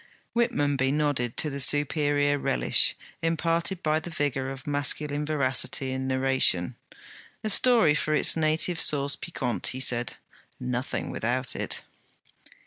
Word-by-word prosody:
Whitmonby 145 - +1
nodded 145 -5 -1
to 150 - -1
the 140 - -5
superior 145 0 +2
relish - - +2 0.3
imparted 165 +3 0
by 155 0 +2
the 160 - -8
vigour 145 -4 -2
of 135 0 -8
masculine 145 0 0
veracity 135 -2 -1
in 130 0 -3
narration. 130 -9 +1 0.7
'A 215 - +1
story 225 -9 +5
for 155 0 0
its - - +2
native 160 +2 +1
sauce 140 -2 +3
piquante,' 125 -1 -2
he 130 - -6
said. 120 -3 -1 0.4
'Nothing 125 0 -3
without 125 +2 -2
it!' - - -4
145 Hz, 130 wpm, -26 LUFS, 130-155 Hz, 0.7 s, story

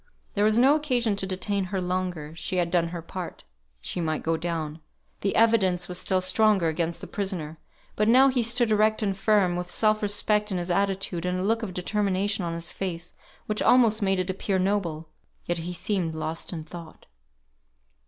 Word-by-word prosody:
There 205 - +1
was 215 +1 +3
no 265 +4 +6
occasion 250 -8 +1
to 190 - 0
detain 190 +1 -1
her 190 +1 -3
longer; 180 -4 -3
she 185 - -3
had 175 -2 0
done 170 -2 +2
her 170 -1 -6
part. 180 0 -7 0.4
She 175 - -3
might 155 -2 -2
go 165 0 +1
down. 160 -2 -3 0.4
The 195 - -1
evidence 195 -6 +3
was 180 0 -3
still 185 -1 +1
stronger 195 -2 +3
against 165 +1 -2
the - - -6
prisoner; 175 -6 -4 0.4
but 210 - +1
now 260 +4 +6
he 255 -2 +1
stood 235 0 +2
erect 215 +1 +3
and 195 -2 0
firm, 195 -3 +2
with 180 0 -4
self 215 +3 +2
respect 210 0 0
in 185 - -1
his 175 0 -3
attitude, 195 -2 -1
and 180 0 -1
a - - -2
look 225 +3 +1
of 195 -5 -5
determination 200 +1 0
on 170 -1 -3
his 170 0 -5
face, 175 -3 -5 0.3
which 210 0 -1
almost 230 -3 +4
made 195 -1 +1
it 185 +1 -1
appear 190 +1 -1
noble. 180 -5 -1 0.4
Yet 175 -1 -2
he 170 +2 -4
seemed 175 -2 -2
lost 160 +1 -4
in 165 -3 -5
thought. 165 0 -11
185 Hz, 190 wpm, -26 LUFS, 175-210 Hz, 0.4 s, no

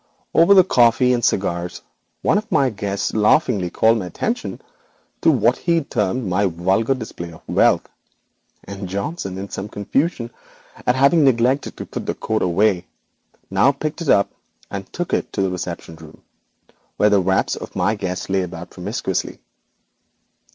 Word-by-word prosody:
'Over 170 +5 +6
the 185 - +8
coffee 125 -5 +4
and 120 -1 -1
cigars 85 -3 -1 0.4
one 205 - +3
of 215 +1 -11
my 135 -2 +3
guests 100 -1 -3
laughingly 105 - +2
called 110 +4 +3
attention 230 - -3 0.6
to - - +4
what 120 -4 +3
he 170 -2 +1
termed 115 -1 -1
my 95 +2 +2
vulgar 95 +9 +1
display 95 -8 -7
of 80 - -15
wealth, - - +2 0.8
and 100 -1 -7
Johnson, 100 - -4
in 100 +1 -6
some 100 +2 -5
confusion 120 - -1 0.6
at 125 - +4
having 140 +5 +4
neglected 130 +1 +2
to - - -6
put - - -6 0.4
away 100 +5 +3
the 90 - -7
coat, - - -33 0.7
now 100 +8 +4
picked 150 +4 -5
it 160 - -3
up, 100 - +4 0.4
and 100 -1 -6
took 175 0 -4
it - - 0
to 95 - 0
the 95 - 0
reception 85 -2 -6
room 80 -1 -15 0.7
where 105 - +4
the 100 -1 +4
wraps 95 +1 +1
of - - -9
my - - +1
guests 90 0 -4
lay 95 0 +1
about 90 -1 -7
promiscuously. 95 0 -3
105 Hz, 160 wpm, -20 LUFS, 95-135 Hz, 0.8 s, the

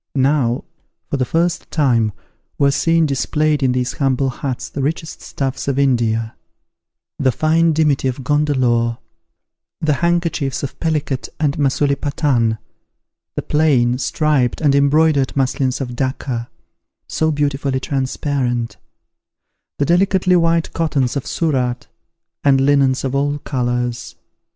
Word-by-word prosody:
Now, 130 -3 +1 0.5
for 140 - 0
the 130 - 0
first 170 +5 -1
time, 120 -8 +2 0.5
were 140 -1 +3
seen 165 +3 +2
displayed 150 +2 0
in 130 -2 +2
these 125 -1 -1
humble 135 -1 0
huts 130 0 -4
the 140 - -5
richest 155 +3 -3
stuffs 135 -1 -4
of 140 -1 0
India; 115 -5 +1 0.8
the 130 -2 +3
fine 160 +5 +2
dimity 150 -4 +1
of 130 +1 -3
Gondelore; 125 -5 +1 0.8
the 155 -1 +1
handkerchiefs 170 -6 0
of 140 - -6
Pellicate 150 -5 -2
and 145 -3 +1
Masulipatan; 140 -4 +1 0.8
the - - -3
plain, 130 -5 +2
striped, 140 -4 +1
and 145 -3 +3
embroidered 140 -1 +3
muslins 130 -1 0
of 125 -3 -4
Dacca, 130 -2 -3 0.6
so 160 - 0
beautifully 140 -3 -1
transparent: 130 -3 -2 1.0
the 145 - +1
delicately 185 +2 +3
white 165 -1 +2
cottons 145 -6 0
of 140 - -3
Surat, 130 -6 -1 0.6
and 135 -2 +4
linens 135 -1 +3
of 135 -1 -2
all 145 +1 0
colours. 120 -3 -3
140 Hz, 120 wpm, -18 LUFS, 125-150 Hz, 1.0 s, and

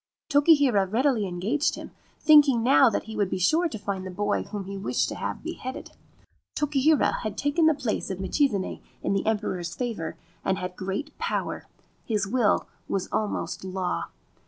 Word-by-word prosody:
Tokihira 285 - +4
readily 230 0 +1
engaged 200 +12 0
him, - - -9 0.3
thinking 290 -6 +6
that 265 0 +6
now - - +2
he 220 0 -9
would 205 -3 +1
be - - -2
sure 320 - +2
to 225 - -5
find 200 -2 -4
the 185 - -6
boy 205 +3 -1
whom 205 -2 -6
he 195 +1 -7
wished 195 - 0
to - - -4
have - - -4
beheaded. 260 +1 -6 0.6
Tokihira 295 0 +2
had 215 -3 -4
taken 295 +3 +2
the 315 - +4
place 255 -6 -2
of 190 - -3
Michizane 200 0 0 0.2
in - - 0
the 195 +2 -1
Emperor's 185 -6 -1
favour, 225 -11 -4 0.3
and 190 - +1
had 180 0 -5
great 195 +12 -4
power; - - -2 0.4
his 210 -4 0
will 225 0 +2 0.2
was 195 - -2
almost 205 -6 -2
law. 185 -1 -2
215 Hz, 170 wpm, -26 LUFS, 190-280 Hz, 0.6 s, thinking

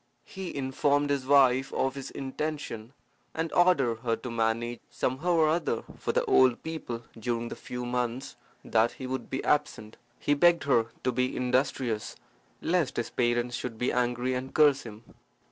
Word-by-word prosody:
He 190 -2 -7
informed 145 +1 +1
his 135 -2 -1
wife 135 -2 +5
of 135 0 0
his 135 -1 -6
intention, 135 -4 -5 0.4
and 160 0 -2
ordered 140 -11 +3
her 115 -1 0
to 125 - -7
manage 115 +1 -1
somehow 150 +8 -1
or 160 -2 +4
other 160 -8 0 0.2
for - - -1
the - - +1
old 130 -2 +4
people 140 -8 -5 0.2
during 115 +1 -2
the - - -6
few 125 0 -6
months 125 +2 -2 0.3
that 115 +1 +2
he 130 - -8
would 130 +1 -4
be 135 - -3
absent. 110 -7 0 0.2
He 145 - +1
begged 170 +2 +4
her 120 -5 +3 0.2
to 130 - +2
be 125 0 -1
industrious, 125 -3 0 0.5
lest 170 -6 +1
his 120 - -2
parents 120 0 0
should 120 -3 -5
be 125 - 0
angry 125 +1 0
and 130 +1 -4
curse 145 -3 +5
him. 110 -2 -10
130 Hz, 165 wpm, -28 LUFS, 120-145 Hz, 0.5 s, wife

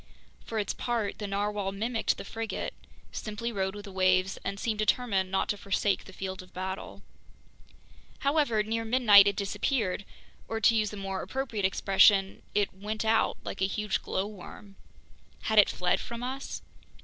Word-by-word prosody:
For 225 - -5
its 210 - 0
part, 230 -5 -2
the 210 - -3
narwhale 200 0 -1
mimicked 225 +4 -1
the - - -7
frigate, 225 +1 -4 0.4
simply 220 +2 -4
rode 190 -2 -2
with 205 0 -8
the 200 - -9
waves, 185 0 +2
and 200 - -3
seemed 220 -2 -1
determined 215 -4 +1
not 190 0 0
to 205 - 0
forsake 200 0 0
the - - -11
field 190 0 -5
of 185 - -17
battle. 190 +1 -5 1.2
However, 280 -7 +2
near 225 +1 -2
midnight 220 -4 +7
it 200 - +2
disappeared, 200 0 -1 0.4
or 225 - -2
to 225 - +5
use 215 -2 +1
a 210 - -7
more 195 -1 -3
appropriate 245 -7 -2
expression, 195 0 +4
"it 205 -1 +2
went 210 +3 -4
out," 220 0 +2
like - - -6
a 190 - +3
huge 210 0 -1
glowworm. 200 0 -5 0.7
Had 220 -1 +4
it 205 - +7
fled 180 0 +1
from 235 0 -6
us? 265 +2 -5
205 Hz, 165 wpm, -29 LUFS, 195-225 Hz, 1.2 s, midnight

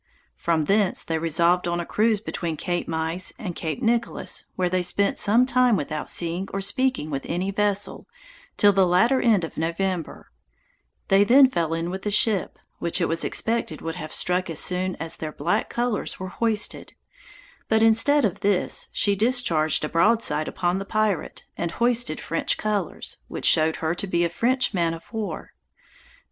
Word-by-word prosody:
From 165 -2 0
thence 200 +2 +2
they 160 -1 -2
resolved 170 +2 +2
on 175 0 -1
a 170 - -4
cruise 215 +2 +1
between 170 -7 -4
Cape 175 +2 -3
Meise 160 +3 -2
and 185 -8 -6
Cape 165 +10 -4
Nicholas, 235 +1 -1
where 185 -1 0
they 185 +1 0
spent 200 +3 +1
some 225 +5 +4
time 250 -3 +3
without 155 0 -4
seeing 175 +3 -1
or 195 - -3
speaking 205 - -1
with 135 -1 -3
any 185 +3 -2
vessel, 205 0 -1 0.5
till 205 -1 +5
the 190 -1 +3
latter 230 +10 +3
end 215 -7 +3
of 165 - -7
November; 170 +1 -3 0.8
they 195 +1 +5
then 260 +5 +6
fell 165 -5 -1
in 165 +1 -3
with 190 +1 -6
a - - +1
ship, 205 -1 +1 0.2
which 170 +2 +1
it 170 - +1
was 165 0 0
expected 225 -9 -1
would 165 - -4
have 155 -3 -7
struck 180 0 0
as 165 - -4
soon 185 0 +1
as 165 0 -3
their 155 -1 -5
black 210 +7 -1
colors 240 -2 -2
were 185 0 -5
hoisted; 220 +1 -1 0.8
but 220 0 +3
instead 230 +5 +4
of 195 - -2
this 200 -2 0
she 200 -1 +2
discharged 195 -10 +2
a - - -5
broadside 170 -4 +2
upon 180 0 -1
the - - -4
pirate, 215 -2 -2
and 170 -1 -4
hoisted 240 -8 +1
French 165 - -1
colors, 205 -5 -3
which - - -6
showed 160 0 +5
her 160 0 -2
to 190 +3 -4
be 175 -2 +1
a - - -1
French 245 +7 0
man 170 -3 0
of 165 - -16
war. 210 -7 -5
185 Hz, 180 wpm, -24 LUFS, 165-220 Hz, 0.8 s, then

